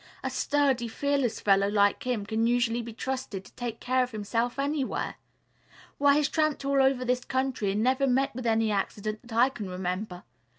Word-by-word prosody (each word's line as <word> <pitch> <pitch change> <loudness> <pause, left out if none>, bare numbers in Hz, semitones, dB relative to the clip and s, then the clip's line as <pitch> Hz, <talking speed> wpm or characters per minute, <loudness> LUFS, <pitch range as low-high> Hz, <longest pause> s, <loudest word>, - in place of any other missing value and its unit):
A - - -2
sturdy, 275 -5 +1
fearless 275 0 0
fellow 195 -1 +3
like 205 -1 +3
him 230 -5 -1
can 220 +2 0
usually 240 -1 +1
be 235 0 -7
trusted 255 -5 -4
to - - -16
take 235 -2 -5
care 255 +1 +1
of 250 - 0
himself 230 +2 -2
anywhere. 280 -1 -2 0.8
Why, 285 0 +5
he's 295 -1 +3
tramped 310 -3 0
all 275 0 +3
over 265 -1 +2
this 250 0 0
country 260 -5 -1
and 205 +3 0
never 260 +2 +2
met 265 +2 +1
with 245 0 -4
any 225 -1 +2
accident 210 +1 -2
that 235 -2 -12
I 250 +3 +6
can 210 -7 -7
remember. 180 +1 -4
245 Hz, 185 wpm, -28 LUFS, 215-265 Hz, 0.8 s, I